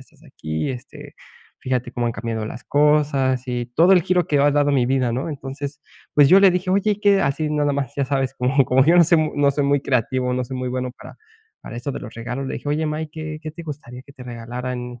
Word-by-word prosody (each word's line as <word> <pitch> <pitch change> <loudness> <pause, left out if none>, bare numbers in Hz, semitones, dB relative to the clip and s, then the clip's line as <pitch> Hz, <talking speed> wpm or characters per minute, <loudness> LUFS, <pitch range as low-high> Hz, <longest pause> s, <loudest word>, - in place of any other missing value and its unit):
estás - - -20
aquí, 80 0 -4
este, 125 -2 -10 0.5
fíjate 125 -1 -2
cómo 120 -1 -1
han 115 - -1
cambiado 110 0 -4
las 115 +3 -8
cosas 145 -3 +2
y 120 -1 -3
todo 175 +4 +6
el 180 -3 +5
giro 180 -1 +1
que 145 - +1
ha 145 - +4
dado 145 0 +2
mi 130 -3 +3
vida, 130 -2 +1
¿no? 130 +6 -2
Entonces, 140 0 -6 0.3
pues, 145 -2 +6
yo 195 +1 +7
le 195 - +7
dije: 180 +1 -1
"Oye 200 +2 +2
y 205 - -6
qué", 200 -1 +4
así 150 +2 -1
nada 145 -1 +1
más, 140 -3 -3
ya 140 - 0
sabes 135 -1 -1
cómo, 130 +2 +2
como 130 +1 +3
yo 170 +3 +5
no 170 - +7
soy 170 0 +4
mu 155 -1 0
no 145 -1 +4
soy 145 - 0
muy 140 0 +2
creativo, 125 -1 0
no 125 - -1
soy 130 +1 -6
muy 125 0 -3
bueno 125 0 -3
para - - -13 0.4
para 115 - -9
esto 130 +3 -4
de - - -6
los 110 - -9
regalos. 125 +4 -5
Le - - -4
dije: 140 +4 -6
"Oye, 155 +2 0
má, 150 +1 -2
¿y 160 - -3
qué 155 0 -7
qué 155 -1 -7
te 170 - -9
gustaría 135 -5 -9
que 140 - -17
te 130 -3 -12
regalaran, 125 +1 -6
135 Hz, 255 wpm, -21 LUFS, 125-150 Hz, 0.5 s, yo